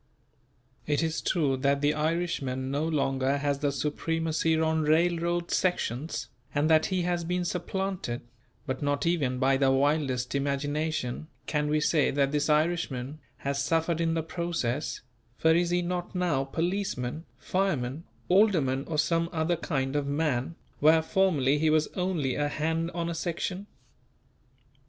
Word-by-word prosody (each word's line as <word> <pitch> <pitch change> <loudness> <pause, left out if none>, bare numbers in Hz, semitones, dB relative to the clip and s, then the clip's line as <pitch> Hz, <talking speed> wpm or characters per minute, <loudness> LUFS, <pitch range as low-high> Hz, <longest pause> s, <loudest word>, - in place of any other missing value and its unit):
It 150 +2 +1
is 160 0 -1
true 145 -7 +1
that 140 +1 +1
the 145 +1 +3
Irishman 150 -5 -1
no 145 +3 0
longer 135 -3 +1
has 140 -1 -1
the 145 -1 +1
supremacy 160 +3 0
on 160 0 +2
railroad 170 +2 +1
sections, 160 -5 -1 0.3
and 145 +2 +2
that 160 0 +5
he 185 -2 0
has 175 -1 0
been 180 +1 -1
supplanted; 180 -7 -3 0.4
but 130 -2 -3
not 145 +1 0
even 145 -7 +1
by 135 +1 +3
the 135 -1 +3
wildest 135 -2 +1
imagination 145 0 -1 0.2
can 150 -1 0
we 155 +1 +2
say 150 0 +2
that 140 -1 +1
this 150 +1 0
Irishman 150 -3 0 0.3
has 140 0 0
suffered 165 +2 +1
in 165 0 +1
the 165 - 0
process; 165 -5 -2 0.4
for 160 0 +4
is 170 +1 +2
he 175 0 +1
not 180 +1 -3
now 170 -7 +1
policeman, 165 -3 -2
fireman, 160 -7 -1 0.2
alderman 170 -10 +3
or 160 - -2
some 165 +2 +1
other 165 +1 +1
kind 135 -5 -2
of 145 -1 0
man 145 0 -1 0.2
where 160 +2 +5
formerly 155 -7 +2
he 160 +1 +3
was 155 0 +3
only 180 -8 -1
a 145 +2 0
hand 160 +2 -1
on 170 -1 -1
a 170 - -2
section? 180 +4 -3
155 Hz, 150 wpm, -28 LUFS, 140-170 Hz, 0.4 s, that